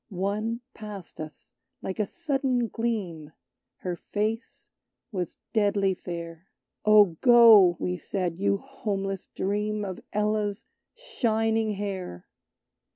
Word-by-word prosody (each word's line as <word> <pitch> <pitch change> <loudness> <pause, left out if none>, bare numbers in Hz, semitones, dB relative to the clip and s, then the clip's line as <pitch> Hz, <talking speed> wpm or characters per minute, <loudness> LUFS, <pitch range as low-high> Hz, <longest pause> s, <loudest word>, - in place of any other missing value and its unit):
One 210 +5 -2
passed 210 -4 -9
us, 155 -1 -10 0.3
like 190 - -4
a 210 - +1
sudden 270 -8 0
gleam; 185 -10 -3 0.5
Her 180 -1 -2
face 215 +6 -3 0.4
was 180 -5 -4 0.2
deadly 200 -3 +2
fair. 170 0 -7 0.4
"Oh, 210 -6 +6
go," 225 -8 +8
we 180 0 -2
said, 180 -1 -3
"you 200 0 +2
homeless 195 -7 -4
Dream 210 +1 -1
Of 185 -2 -5
Ella's 210 0 0 0.3
shining 225 - 0
hair! 190 - -5
205 Hz, 105 wpm, -27 LUFS, 185-225 Hz, 0.5 s, go